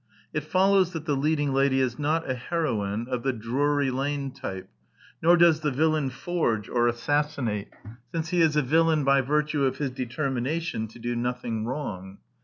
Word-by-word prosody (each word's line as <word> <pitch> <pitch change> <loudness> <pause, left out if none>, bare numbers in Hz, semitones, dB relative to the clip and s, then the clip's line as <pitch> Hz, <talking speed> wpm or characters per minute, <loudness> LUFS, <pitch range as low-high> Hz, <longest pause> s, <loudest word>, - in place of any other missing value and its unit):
It 150 - -1
follows 190 +1 +3
that 160 -2 -5
the 150 -3 +1
leading 145 0 +1
lady 135 0 +3
is 125 -2 0
not 155 +2 0
a 130 - 0
heroine 120 -7 -2
of 125 -2 -2
the 135 - +1
Drury 135 +4 0
Lane 140 +1 -2
type; 95 -7 -6 0.5
nor 170 +2 +5
does 170 -2 +5
the 155 -1 0
villain 155 0 +1
forge 130 - -1
or 120 -1 +2
assassinate, 120 -4 -1 0.4
since 165 -1 -3
he 175 0 +2
is 155 -2 +3
a 150 - +3
villain 160 +2 +3
by 135 0 +4
virtue 150 +2 0
of 130 - +1
his 140 -3 -2
determination 130 +1 -2
to 110 - -15
do 120 +1 -3
nothing 120 -2 -2
wrong. 100 -8 -5
140 Hz, 175 wpm, -26 LUFS, 120-155 Hz, 0.5 s, nor